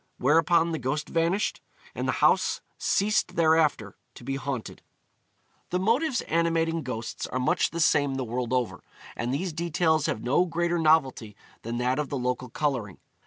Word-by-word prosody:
Whereupon 165 +4 +3
the 160 - -2
ghost 140 +4 -2
vanished, 170 +5 0 0.3
and - - -3
the - - +1
house - - +3 0.2
ceased 200 -3 +1
thereafter 155 - +2 0.2
to - - -12
be 135 +2 -3
haunted. 135 -3 -5 0.9
The 180 - 0
motives 245 - +1
animating 165 0 0
ghosts 120 -5 -5
are - - -4
much 125 - +1
the 170 - -5
same 145 -4 +3
the 135 - -2
world 120 +1 -3
over, 125 -2 -1 0.3
and 120 +1 -3
these 165 +5 -2
details 160 -1 +1
have 110 - -3
no 145 +9 +2
greater 170 +1 0
novelty 135 -9 +2 0.3
than 115 +1 -4
that 125 +3 0
of 150 - -2
the 140 - -2
local 125 0 -2
colouring. 120 - -2
150 Hz, 165 wpm, -26 LUFS, 125-170 Hz, 0.9 s, Whereupon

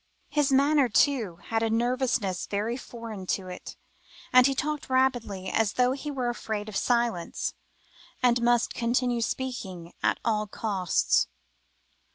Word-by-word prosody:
His 295 -1 +2
manner, 280 0 +4
too, 230 - +2
had 225 0 +1
a 225 - +1
nervousness 235 -5 0
very 210 +4 -1
foreign 230 -6 -8
to 185 -2 -10
it, 180 - -8 0.6
and 255 +1 +8
he 275 - 0
talked 300 +1 -2
rapidly, 245 -8 +1
as 225 -2 +1
though 250 0 +3
he 280 +3 -4
were 255 -4 -1
afraid 220 -3 -4
of 215 - -7
silence, 235 -8 0 0.7
and 240 -1 +4
must 240 0 +2
continue 240 0 0
speaking 195 -10 -4
at - - +1
all 215 -2 +1
costs. 195 -4 +1
235 Hz, 140 wpm, -27 LUFS, 210-260 Hz, 0.7 s, and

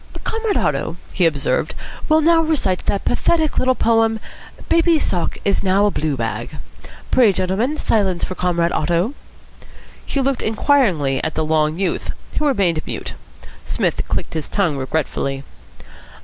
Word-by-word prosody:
"Comrade 445 -2 -1
Otto," 165 - -1 0.2
he 180 -3 +3
observed, 145 -4 -1 0.3
"will 310 0 +5
now 330 +1 +5
recite 300 - 0
that 200 - -1
pathetic 320 -3 +1
little 255 0 +2
poem 225 -1 +2 0.5
'Baby's 335 -1 +3
Sock 175 -2 -1
is 200 - +2
now 195 +1 +3
a 205 - +2
Blue 150 -5 -1
bag.' 115 +5 -4 0.5
Pray, 240 -5 +5
gentlemen, 200 +11 -1
silence 195 - +1
for - - -2
Comrade 175 -2 0
Otto." 175 - 0 0.9
He 280 - -2
looked 270 -1 0
inquiringly 210 - +2
at 160 - -2
the 160 - 0
long 155 0 +1
youth, 195 0 -1 0.3
who 305 - +1
remained 185 - +1
mute. - - -4 0.5
Psmith - - -1
clicked - - -3
his 160 -2 -4
tongue 185 -8 +1
regretfully. 135 0 -2
190 Hz, 145 wpm, -20 LUFS, 160-260 Hz, 0.9 s, will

